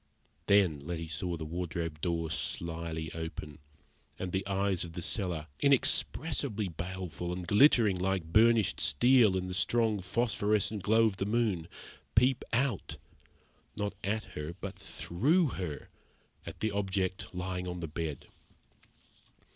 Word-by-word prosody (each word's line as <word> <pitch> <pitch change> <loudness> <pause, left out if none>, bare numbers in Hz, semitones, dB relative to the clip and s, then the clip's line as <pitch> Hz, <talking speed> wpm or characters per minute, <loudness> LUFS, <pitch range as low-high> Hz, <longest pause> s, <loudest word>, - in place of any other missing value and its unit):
Then 95 -7 +4
Letty 80 +2 -5
saw 85 +2 -2
the 80 - -5
wardrobe 85 -1 -4
door 85 -2 -1
slyly 80 -1 -3
open, 80 -2 -6 0.6
and 95 -1 -4
the 95 +1 -1
eyes 100 -2 +1
of 85 -1 -8
the 90 - -5
cellar 90 -6 -1
inexpressibly 140 -4 +2
baleful, 90 0 -5
and 90 0 -4
glittering 105 - +5
like 95 -1 0
burnished 115 -2 +4
steel 110 - +5
in 90 - -2
the 90 - -5
strong 110 +2 +2
phosphorescent 105 0 0
glow 110 +4 +4
of 105 -4 0
the 95 - -2
moon, 105 -7 0 0.5
peep 125 +3 +4
out, 125 -3 0 0.8
not 105 -1 -2
at 105 +3 -1
her 75 +3 -5
but 100 -1 -5
through 145 - +1
her, 90 -10 -5 0.6
at - - -8
the 110 - +1
object 95 -2 -2
lying 90 0 -3
on 90 0 -4
the 85 - -4
bed. 75 -2 -4
95 Hz, 135 wpm, -31 LUFS, 85-110 Hz, 0.8 s, glittering